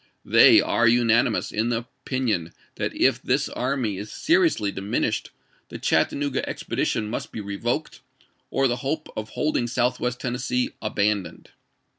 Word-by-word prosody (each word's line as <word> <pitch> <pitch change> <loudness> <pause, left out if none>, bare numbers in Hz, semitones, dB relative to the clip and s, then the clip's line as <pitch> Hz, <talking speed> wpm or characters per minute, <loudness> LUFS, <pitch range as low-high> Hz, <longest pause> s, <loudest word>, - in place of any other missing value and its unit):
They - - +7
are 120 - +2
unanimous 115 -1 +3
in 115 +3 0
opinion 115 - -2 0.2
that - - -2
if - - +2
this - - +1
army 125 -7 -2
is 105 +1 -7
seriously 325 - +2
diminished 100 +1 -2 0.4
the - - -7
Chattanooga 140 -1 0
expedition 105 - -2
must 110 - -5
be - - -6
revoked 100 -1 -3 0.5
or 135 0 +2
the 120 -1 -1
hope 145 +5 -3
of 110 0 -5
holding 150 -5 -1
Southwest 125 0 -1
Tennessee 125 0 -1
abandoned. 100 -4 -1
120 Hz, 130 wpm, -24 LUFS, 105-130 Hz, 0.5 s, They